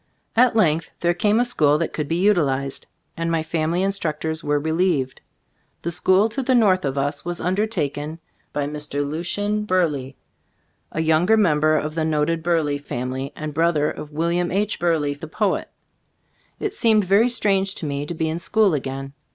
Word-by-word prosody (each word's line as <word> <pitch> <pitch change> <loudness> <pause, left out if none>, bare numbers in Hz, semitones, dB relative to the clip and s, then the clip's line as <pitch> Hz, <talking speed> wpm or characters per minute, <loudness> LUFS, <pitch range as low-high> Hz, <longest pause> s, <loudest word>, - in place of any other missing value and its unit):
At 245 0 +4
length 165 -7 +2
there 175 0 +2
came 210 +5 +2
a 245 - +3
school 150 -11 +3
that 165 - -2
could 150 -2 -3
be 165 - -1
utilized, 145 -8 +1 0.3
and 165 0 -2
my 165 -1 0
family 165 +2 -1
in 195 - +2
structors 160 -3 -3
were 145 0 +1
relieved. 160 -4 0 0.6
The 170 - -2
school 190 +4 +3
to 270 +5 -3
the 260 0 +2
north 190 -8 +3
of 135 0 -2
us 145 +1 -1
was 175 0 -3
undertaken 165 -6 -2 0.3
by 145 -1 -1
Mr. 145 -1 -3
Lucian 205 +7 -2
Burleigh, 155 -9 0 0.8
a 160 - -1
younger 165 +7 +3
mem 170 -9 +3
ber 155 +1 +3
of 150 0 -2
the 160 0 -1
noted 160 +1 0
Burleigh 160 -4 0
family, 130 0 -4
and 155 -1 -5
brother 160 -1 +2
of 150 - -8
William 170 +3 0
H. 205 +2 0
Burleigh, 160 -4 +1
the 150 +3 -9
poet. 200 +4 -1 0.9
It 420 - -2
seemed 220 - +3
very 200 +6 +4
strange 195 -5 +1
to - - -5
me 145 0 -3
to 170 - -4
be 160 0 -1
in 160 +2 -2
school 210 0 +2
again. 135 -1 -4
165 Hz, 180 wpm, -22 LUFS, 150-190 Hz, 0.9 s, At